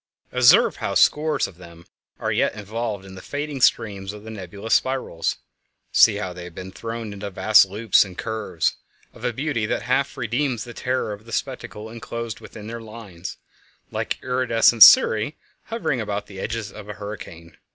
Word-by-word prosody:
Observe - - +5
how - - -3
scores 150 -2 +3
of 85 - -10
them 85 -1 -14 0.3
are - - -1
yet - - +1
involved 105 -1 -4
in 95 - -11
the 95 - -10
fading 145 -1 -4
streams 100 -4 +1
of 105 0 -11
the 110 - -8
nebulous 100 +1 -4
spirals; 130 -9 0 0.5
see 110 - +6
how 95 -3 -4
they 90 0 -8
have 90 -1 -11
been 95 0 -7
thrown 115 +1 -6
into 100 0 -6
vast 100 +1 +5
loops 105 +2 +3
and 95 -3 -11
curves, 105 -7 -2 0.4
of - - -15
a 120 - +1
beauty 125 -3 -2
that - - -1
half - - 0
redeems 120 0 -1
the 120 - -9
terror 125 -3 -2
of 105 +2 -11
the 115 - -12
spectacle 110 -3 -4
enclosed 115 0 -6
within 105 - -11
their 115 +1 -6
lines—like 105 -6 -8
iridescent 120 -2 +3
cirri 110 +9 +8 0.3
hovering 225 - -2
about 105 -1 -3
the 95 -2 -11
edges 115 +1 -4
of 105 -1 -11
a - - -4
hurricane. 100 -6 -9
110 Hz, 170 wpm, -23 LUFS, 100-115 Hz, 0.5 s, cirri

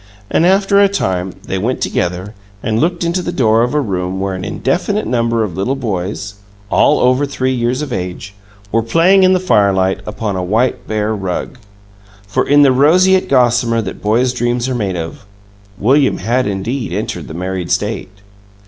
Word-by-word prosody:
And, 170 - +3
after 195 +1 +3
a 200 - +5
time, 95 - -2
they 95 - -3
went 120 +6 -1
together, 90 +4 -2 0.3
and 110 -1 0
looked 170 +3 0
into 170 +2 0
the 175 - -3
door 115 -6 +2
of 125 +5 0
a - - +3
room 95 -6 -2
where 95 0 -2
an 90 -1 -5
indefinite 180 - -1
number 115 -2 0
of 95 -6 -4
little 100 +9 -1
boys 100 -4 -4 0.3
all 150 - +3
over 130 +3 +3
three 130 -1 -1
years 125 +3 -1
of 140 -5 -5
age 90 +1 -5 0.4
were 115 - +2
playing 165 +11 +4
in 185 0 +5
the 185 - +2
firelight 100 - +2
upon 105 -1 -3
a 90 - -2
white 110 +7 0
bear 110 0 -1
rug. 100 +6 -4 0.7
For, 115 +6 -1
in 145 0 +6
the 135 - +5
roseate 185 +8 +4
gossamer 120 -3 +2
that 95 - -7
boys' 120 +4 +1
dreams 120 0 -1
are 130 - -2
made 100 -6 -2
of, 85 - -6 0.5
William 135 +7 +2
had 120 +6 0
indeed 115 +6 -3
entered - - -4
the 80 - -8
married 90 0 -4
state. 100 0 -1
115 Hz, 180 wpm, -16 LUFS, 95-140 Hz, 0.7 s, in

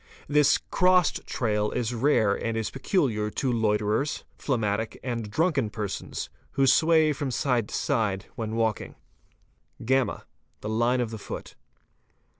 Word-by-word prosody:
This 145 -1 +4
"crossed" 180 -2 +3
trail 105 -3 0
is 120 -1 -2
rare 115 -4 +3
— - - -7
and 115 -1 -1
is 110 -1 -2
peculiar 125 - 0
to 130 +4 -1
loiterers, 110 +4 0
phlegmatic, 110 -4 -1
and 115 -4 -3
drunken 140 - +1
persons, 105 -2 -4 0.3
who 135 0 +3
sway 160 +2 +4
from 140 -1 -3
side 125 -4 0
to - - -4
side 105 -8 0
when 110 -3 -3
walking. 115 -2 -1 0.4
| - - -41
(y) 130 +2 +1 0.4
The 105 - -4
line 120 +3 +2
of 115 -2 -2
the 110 - -6
foot. - - -7
120 Hz, 145 wpm, -26 LUFS, 110-140 Hz, 0.4 s, This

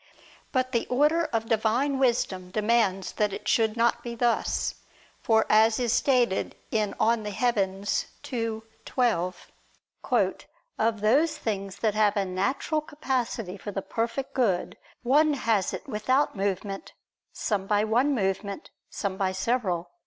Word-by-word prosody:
But 255 -1 0
the 235 -2 0
order 300 +6 +3
of 225 -4 -2
Divine 235 +5 +1
wisdom 220 -8 0
demands 210 -2 +1
that 210 -1 0
it - - -7
should 220 0 +2
not 235 0 +2
be 235 0 -6
thus; 235 0 0 0.5
for 220 -1 +3
as 220 +2 +4
is 240 -2 +1
stated 245 -7 +2 0.2
in 215 -2 0
De - - -12
Coelo 210 -3 0 0.5
ii, 225 -2 -2 0.2
12, 185 -8 -1 1.3
"of 220 -1 +1
those 275 +10 +3
things 195 -3 -3
that 220 -2 0
have 210 0 +2
a 200 - +1
natural 200 - -1
capacity 250 -9 -3
for 205 - -7
the 195 -1 -4
perfect 235 +4 -3
good, 210 -9 0 0.3
one 295 +5 +4
has 225 -7 +1
it - - -7
without 255 +5 +1
movement, 195 0 -3 0.4
some 200 -3 -2
by 210 0 +2
one 245 +6 +2
movement, 200 - -2 0.2
some 195 -2 -3
by 190 -2 0
several." 190 -4 -1
220 Hz, 140 wpm, -27 LUFS, 200-245 Hz, 1.3 s, as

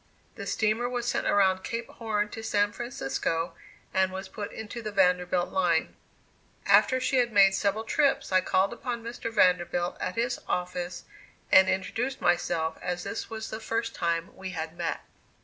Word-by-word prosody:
The - - -7
steamer 220 +3 +1
was 245 -1 -3
sent - - 0
around 190 -2 +3
Cape 230 0 -4
Horn 210 -2 -2
to 225 - -7
San 205 -2 +1
Francisco, 165 - -2 0.4
and 190 0 +2
was 190 0 -6
put 205 +1 -6
into 220 +2 -7
the 215 -1 -4
Vanderbilt 180 -2 +2
line. 175 -4 +1 0.7
After 260 - +5
she 260 +1 +1
had 240 -1 +2
made 195 -2 +6
several 200 +2 0
trips 275 +2 +1
I 185 0 +5
called 190 +3 +1
upon 240 -1 -4
Mr. 230 0 -5
Vanderbilt, 175 -3 +2
at 185 - -2
his 240 +2 0
office, 180 0 -3 0.5
and 190 0 +7
introduced 245 +7 -1
myself, 165 -2 0
as 180 0 -3
this 200 - -5
was 220 -1 -6
the 220 - -4
first 225 +1 -2
time 170 0 -2
we 190 0 -6
had 160 +1 -4
met. 170 -1 -2
195 Hz, 165 wpm, -28 LUFS, 180-230 Hz, 0.7 s, and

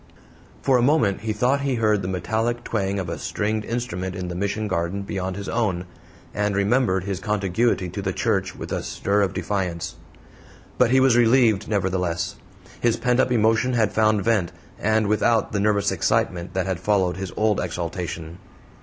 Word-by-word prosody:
For 130 -2 +4
a - - +2
moment 120 -8 +2
he 110 0 -2
thought 125 +6 +1
he 140 -2 0
heard 110 -3 +2
the 90 - -4
metallic 110 +6 -1
twang 100 -4 -1
of 95 -3 -3
a 85 -2 -4
stringed 105 +6 -2
instrument 95 -6 -3
in 90 -1 -4
the - - -4
Mission 100 +3 -2
garden 95 +1 -2
beyond 95 -1 -3
his 100 0 -6
own, 95 -7 -1 0.5
and 105 -1 0
remembered 100 -2 +2
his 95 -2 -3
contiguity 105 -1 0
to 95 +4 -5
the 95 -1 -1
church - - -1
with - - -8
a - - -1
stir 100 +1 0
of 95 -1 0
defiance. 90 -5 -3 0.8
But 125 - +5
he 130 +2 +4
was 130 -2 +4
relieved, 115 -3 +4
nevertheless. 90 -5 -1 0.4
His 120 -2 +2
pent 125 +1 +1
up 130 - +2
emotion 115 +2 +2
had 110 -4 +1
found 110 -2 +3
vent, 100 -6 +1 0.3
and 110 0 +2
without 110 +2 +2
the 100 - -1
nervous 100 -1 +2
excitement 85 +1 0
that 95 -1 0
had 95 -3 -2
followed 95 -2 +1
his 95 -1 -5
old 110 -1 +2
exaltation. 85 -1 -4
100 Hz, 180 wpm, -23 LUFS, 95-115 Hz, 0.8 s, But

